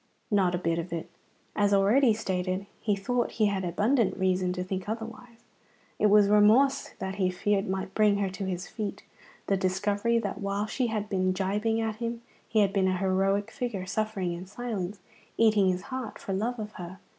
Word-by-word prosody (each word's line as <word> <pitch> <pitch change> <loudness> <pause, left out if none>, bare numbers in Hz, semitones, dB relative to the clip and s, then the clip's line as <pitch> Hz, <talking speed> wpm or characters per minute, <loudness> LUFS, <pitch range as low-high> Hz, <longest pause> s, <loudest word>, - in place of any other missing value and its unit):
Not 190 -3 +3
a - - 0
bit 165 -1 0
of 170 +1 -5
it. 170 +1 -5 0.4
As 205 -1 +3
already 225 +6 +4
stated, 190 -3 -2
he 210 -2 +1
thought 240 +5 -1
he 220 - +2
had 200 -2 0
abundant 210 +6 +1
reason 185 -1 +1
to 180 0 -3
think 185 +1 -4
otherwise. 230 +1 -7 0.6
It 215 - +4
was 205 0 +6
remorse 215 +7 +4
that 190 +1 -4
he 185 -2 +2
feared 195 +2 0
might 190 0 -3
bring 210 -2 +4
her 200 -1 0
to 190 +1 -5
his 180 -1 -3
feet, 210 -3 -5 0.4
the 195 - +1
discovery 205 +5 +1
that 205 -2 -3
while 200 +1 -1
she 245 +3 -1
had 215 -2 -2
been 185 -2 +1
gibing 205 +4 0
at 220 -1 -2
him 235 0 -4 0.3
he 215 - +3
had 195 -1 +2
been 190 -2 +2
a 185 0 +1
heroic 195 +2 +1
figure, 235 -8 -3
suffering 195 -2 -2
in 175 +2 -7
silence, 205 -3 -4 0.4
eating 215 -4 +4
his 185 0 -1
heart 260 -4 -5
for 195 - -5
love 230 +6 -1
of 210 -1 -5
her. 175 +2 -8
200 Hz, 190 wpm, -28 LUFS, 185-220 Hz, 0.6 s, was